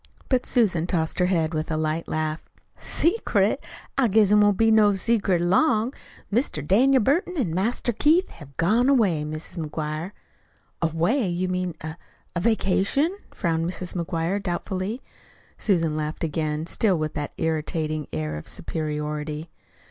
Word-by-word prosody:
But 255 Hz, -2 st, +1 dB
Susan 180 Hz, -9 st, +2 dB
tossed 165 Hz, -2 st, 0 dB
her 180 Hz, -, +3 dB
head 165 Hz, -3 st, +1 dB
with 155 Hz, 0 st, -2 dB
a 155 Hz, -, -1 dB
light 155 Hz, +1 st, -1 dB
laugh. 155 Hz, 0 st, -2 dB, 0.3 s
"Secret! 375 Hz, +8 st, +1 dB, 0.4 s
I 260 Hz, -, +4 dB
guess 210 Hz, -1 st, +4 dB
't 210 Hz, -, +6 dB
won't 205 Hz, -2 st, +4 dB
be 225 Hz, 0 st, +4 dB
no 210 Hz, -2 st, +5 dB
secret 195 Hz, -4 st, +1 dB
long. 220 Hz, -, +2 dB, 0.4 s
Mr. 210 Hz, -, 0 dB
Daniel 255 Hz, +5 st, +4 dB
Burton 340 Hz, -, +1 dB
an' 205 Hz, -, 0 dB
Master 230 Hz, +6 st, 0 dB
Keith 320 Hz, -, +3 dB
have 140 Hz, -4 st, -14 dB
gone 220 Hz, +10 st, +3 dB
away, 200 Hz, -, +3 dB
Mis' 155 Hz, +1 st, -6 dB
McGuire." 155 Hz, +2 st, -4 dB, 0.7 s
"Away! 170 Hz, -, +1 dB
You 180 Hz, +1 st, -1 dB
mean 180 Hz, -2 st, -2 dB
a 155 Hz, +1 st, -6 dB, 0.4 s
a -, -, +1 dB
vacation?" 225 Hz, -, +2 dB, 0.2 s
frowned 165 Hz, -3 st, -1 dB
Mrs. 180 Hz, 0 st, -5 dB
McGuire 170 Hz, +2 st, -1 dB
doubtfully. 190 Hz, +5 st, -3 dB, 0.6 s
Susan 165 Hz, -7 st, +1 dB
laughed 155 Hz, +1 st, -3 dB
again, 155 Hz, 0 st, -1 dB
still 190 Hz, +2 st, +1 dB
with 155 Hz, -1 st, -2 dB
that 145 Hz, -1 st, -4 dB
irritating 155 Hz, -1 st, -2 dB
air 75 Hz, -1 st, -3 dB
of 75 Hz, -, -9 dB
superiority. 150 Hz, 0 st, -4 dB
175 Hz, 150 wpm, -24 LUFS, 155-215 Hz, 0.7 s, t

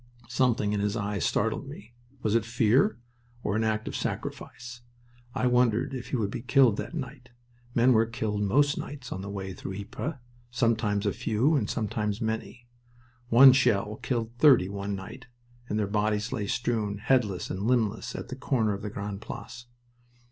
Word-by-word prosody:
Something 120 Hz, -5 st, +1 dB
in 105 Hz, -, 0 dB
his 105 Hz, +2 st, 0 dB
eyes 100 Hz, -2 st, -2 dB
startled -, -, 0 dB
me. 110 Hz, +4 st, -11 dB, 0.3 s
Was 110 Hz, -, +1 dB
it 115 Hz, -2 st, +3 dB
fear, 115 Hz, -, +2 dB, 0.5 s
or 105 Hz, -, -1 dB
an 110 Hz, -, +1 dB
act 110 Hz, -1 st, -1 dB
of -, -, -4 dB
sacrifice? 125 Hz, 0 st, -5 dB, 0.5 s
I -, -, 0 dB
wondered 125 Hz, +1 st, +2 dB
if 125 Hz, -2 st, -5 dB
he -, -, -2 dB
would 105 Hz, -5 st, -1 dB
be -, -, -4 dB
killed 130 Hz, -3 st, +4 dB
that -, -, -5 dB
night. 130 Hz, -4 st, -7 dB, 0.5 s
Men 125 Hz, +2 st, +5 dB
were 110 Hz, 0 st, +3 dB
killed 110 Hz, -2 st, -2 dB
most 145 Hz, +9 st, +2 dB
nights 135 Hz, -4 st, -7 dB
on 95 Hz, -, -4 dB
the 100 Hz, -, -6 dB
way 95 Hz, -1 st, -5 dB
through 95 Hz, +1 st, -7 dB
Ypres, 110 Hz, +9 st, -5 dB, 0.3 s
sometimes 115 Hz, -3 st, +1 dB
a 100 Hz, -, +1 dB
few 120 Hz, +9 st, +1 dB
and 110 Hz, -8 st, 0 dB
sometimes 105 Hz, -1 st, -2 dB
many. 110 Hz, +1 st, -4 dB, 0.6 s
One 130 Hz, +3 st, +9 dB
shell 105 Hz, -5 st, +2 dB
killed 115 Hz, -3 st, -2 dB
thirty 130 Hz, -12 st, +6 dB
one 100 Hz, 0 st, -3 dB
night, 110 Hz, +7 st, -9 dB, 0.4 s
and 105 Hz, -, -1 dB
their 105 Hz, -, +1 dB
bodies 105 Hz, +2 st, 0 dB
lay 105 Hz, -2 st, -2 dB
strewn, 110 Hz, -3 st, -1 dB
headless 110 Hz, -4 st, +1 dB
and 95 Hz, -, -4 dB
limbless, 115 Hz, -4 st, 0 dB
at -, -, -6 dB
the 130 Hz, -, -5 dB
corner 120 Hz, -5 st, 0 dB
of 100 Hz, -, -5 dB
the 105 Hz, -, -4 dB
Grande 100 Hz, 0 st, -5 dB
Place. 120 Hz, +1 st, -8 dB
110 Hz, 175 wpm, -28 LUFS, 105-125 Hz, 0.6 s, One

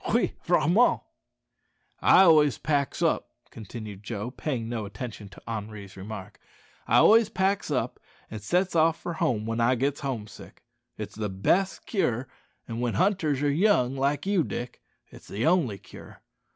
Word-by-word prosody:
Oui, -, -, +2 dB
vraiment." 185 Hz, -, +3 dB, 1.0 s
"I -, -, +6 dB
always 155 Hz, -5 st, +5 dB
packs 145 Hz, -3 st, -1 dB
up," -, -, +1 dB, 0.2 s
continued 110 Hz, -2 st, -9 dB
Joe, 105 Hz, +2 st, -5 dB
paying 125 Hz, -4 st, -3 dB
no 115 Hz, -2 st, -3 dB
attention 105 Hz, 0 st, -8 dB
to 95 Hz, -, -15 dB
Henri's 105 Hz, -3 st, -6 dB
remark 100 Hz, 0 st, -8 dB, 0.5 s
"I -, -, +4 dB
always 225 Hz, 0 st, +6 dB
packs 190 Hz, +1 st, 0 dB
up -, -, -2 dB, 0.3 s
an' 110 Hz, -, -5 dB
sets 180 Hz, -, 0 dB
off 165 Hz, 0 st, +3 dB
for 170 Hz, -, -5 dB
home 115 Hz, -9 st, -1 dB
when 115 Hz, +1 st, -2 dB
I 125 Hz, +2 st, +3 dB
gits 140 Hz, +3 st, -1 dB
home 130 Hz, -7 st, -3 dB
sick. 105 Hz, -, -14 dB, 0.3 s
It's -, -, -6 dB
the 105 Hz, -1 st, -3 dB
best 175 Hz, -, 0 dB
cure; 130 Hz, -, -1 dB, 0.4 s
an' 115 Hz, 0 st, -5 dB
when 120 Hz, -1 st, -1 dB
hunters 170 Hz, -8 st, +1 dB
are 145 Hz, -, +2 dB
young 145 Hz, -, +2 dB
like 140 Hz, +3 st, 0 dB
you, 195 Hz, -4 st, +2 dB
Dick, 120 Hz, -3 st, -6 dB, 0.3 s
it's -, -, -14 dB
the 105 Hz, +6 st, -3 dB
only 160 Hz, -, +2 dB
cure. -, -, -14 dB
130 Hz, 160 wpm, -27 LUFS, 110-165 Hz, 1.0 s, I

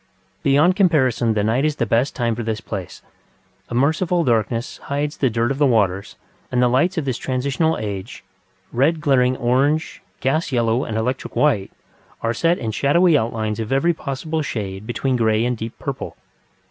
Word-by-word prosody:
Beyond 150 Hz, +7 st, +4 dB
comparison 130 Hz, -, +2 dB
the 105 Hz, -, +1 dB
night 115 Hz, +6 st, +1 dB
is 155 Hz, -1 st, +1 dB
the 120 Hz, -, 0 dB
best 115 Hz, +5 st, +1 dB
time 120 Hz, -3 st, 0 dB
for 115 Hz, -, -4 dB
this 110 Hz, -1 st, -2 dB
place; 100 Hz, -4 st, -7 dB, 0.7 s
a -, -, -4 dB
merciful 165 Hz, +6 st, +2 dB
darkness 115 Hz, -2 st, 0 dB
hides 145 Hz, +1 st, -2 dB
the 130 Hz, -, +2 dB
dirt 115 Hz, +2 st, 0 dB
of 135 Hz, -, -3 dB
the 145 Hz, -, +5 dB
waters, 100 Hz, -5 st, +1 dB, 0.4 s
and 125 Hz, -, +1 dB
the 125 Hz, -, +4 dB
lights 160 Hz, +10 st, +2 dB
of 160 Hz, -, -1 dB
this 130 Hz, -3 st, -2 dB
transitional 140 Hz, +5 st, 0 dB
age, 100 Hz, -3 st, -6 dB, 0.5 s
red 145 Hz, +7 st, +2 dB
glaring 130 Hz, -4 st, +2 dB
orange, 135 Hz, +6 st, +1 dB, 0.2 s
gas 155 Hz, +5 st, 0 dB
yellow, 120 Hz, +1 st, +1 dB
and 110 Hz, -, -3 dB
electric 125 Hz, +4 st, -3 dB
white, 115 Hz, -10 st, +2 dB, 0.5 s
are 115 Hz, 0 st, +1 dB
set 170 Hz, +8 st, +2 dB
in 115 Hz, -2 st, -3 dB
shadowy 165 Hz, -, +3 dB
outlines 110 Hz, -4 st, -1 dB
of 110 Hz, +1 st, -4 dB
every 135 Hz, +6 st, +3 dB
possible 155 Hz, +2 st, -3 dB
shade 105 Hz, -6 st, -5 dB
between 130 Hz, +1 st, -1 dB
grey 110 Hz, -1 st, +2 dB
and 125 Hz, 0 st, 0 dB
deep 115 Hz, +1 st, -6 dB
purple. -, -, -5 dB
125 Hz, 175 wpm, -21 LUFS, 115-145 Hz, 0.7 s, the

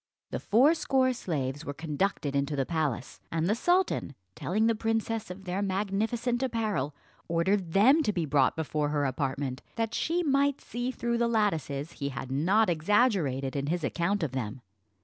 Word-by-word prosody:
The -, -, -2 dB
fourscore 265 Hz, +1 st, +3 dB
slaves 145 Hz, -, -3 dB
were 145 Hz, -, -5 dB
conducted 155 Hz, -1 st, -1 dB
into 140 Hz, +1 st, 0 dB
the 135 Hz, -1 st, 0 dB
palace; 150 Hz, -6 st, -2 dB
and 165 Hz, 0 st, 0 dB
the 205 Hz, -, +3 dB
sultan, 350 Hz, -, +1 dB, 0.2 s
telling 210 Hz, -, 0 dB
the 230 Hz, -, +4 dB
princess 225 Hz, -1 st, -1 dB
of 185 Hz, +2 st, -8 dB
their 185 Hz, +1 st, -2 dB
magnificent 210 Hz, +5 st, -1 dB
apparel, 215 Hz, -, -1 dB, 0.3 s
ordered 170 Hz, +1 st, +1 dB
them 260 Hz, +11 st, +6 dB
to 245 Hz, -, +1 dB
be 175 Hz, -5 st, -1 dB
brought 140 Hz, -3 st, +3 dB
before 150 Hz, -2 st, -1 dB
her 145 Hz, -1 st, 0 dB
apartment, 135 Hz, 0 st, -2 dB
that 225 Hz, 0 st, -1 dB
she 345 Hz, +7 st, 0 dB
might 280 Hz, -2 st, +2 dB
see 245 Hz, +2 st, -4 dB
through 235 Hz, -2 st, -1 dB
the 235 Hz, -, +3 dB
lattices 165 Hz, -, 0 dB
he 140 Hz, -4 st, -4 dB
had 130 Hz, -1 st, -6 dB
not 185 Hz, +11 st, +3 dB
exaggerated 165 Hz, -, +1 dB
in 140 Hz, 0 st, -1 dB
his 170 Hz, +1 st, -1 dB
account 170 Hz, +7 st, 0 dB
of 150 Hz, -, -1 dB
them. 125 Hz, -2 st, -4 dB
185 Hz, 170 wpm, -29 LUFS, 145-225 Hz, 0.3 s, them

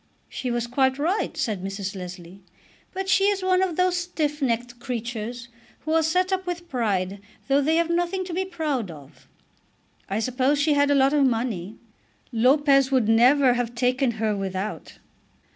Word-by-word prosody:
"She 255 Hz, -, -4 dB
was 240 Hz, -1 st, -1 dB
quite 265 Hz, +2 st, +1 dB
right," 340 Hz, +8 st, -1 dB
said 205 Hz, -6 st, -2 dB
Mrs. 195 Hz, +1 st, -4 dB
Leslie. 180 Hz, 0 st, -9 dB, 0.5 s
"But 380 Hz, +1 st, -4 dB
she 390 Hz, +1 st, +3 dB
is 400 Hz, -2 st, +1 dB
one 370 Hz, 0 st, +3 dB
of 370 Hz, -3 st, 0 dB
those 365 Hz, +1 st, +2 dB
stiff 315 Hz, -4 st, -2 dB
necked 240 Hz, -1 st, -1 dB
creatures 240 Hz, -1 st, -5 dB, 0.3 s
who 315 Hz, -, -2 dB
are 325 Hz, -, +4 dB
set 360 Hz, +4 st, +1 dB
up 375 Hz, -1 st, -2 dB
with 350 Hz, -1 st, -4 dB
pride 200 Hz, -, -1 dB, 0.3 s
though 280 Hz, +1 st, +3 dB
they 315 Hz, +3 st, +2 dB
have 335 Hz, 0 st, +1 dB
nothing 350 Hz, +2 st, 0 dB
to 360 Hz, -, -6 dB
be 375 Hz, +2 st, 0 dB
proud 310 Hz, -, -3 dB
of. 140 Hz, -4 st, -13 dB, 0.8 s
I 195 Hz, -, -1 dB
suppose 255 Hz, +5 st, +1 dB
she 295 Hz, +1 st, +3 dB
had 285 Hz, 0 st, +3 dB
a 285 Hz, -, +4 dB
lot 270 Hz, +1 st, +4 dB
of 290 Hz, -2 st, +3 dB
money. 225 Hz, -5 st, -2 dB, 0.5 s
Lopez 275 Hz, +3 st, +4 dB
would 255 Hz, -5 st, +2 dB
never 250 Hz, +4 st, +5 dB
have 240 Hz, -1 st, -3 dB
taken 250 Hz, +1 st, +1 dB
her 220 Hz, -1 st, -1 dB
without." 195 Hz, +1 st, -5 dB
260 Hz, 175 wpm, -24 LUFS, 225-320 Hz, 0.8 s, never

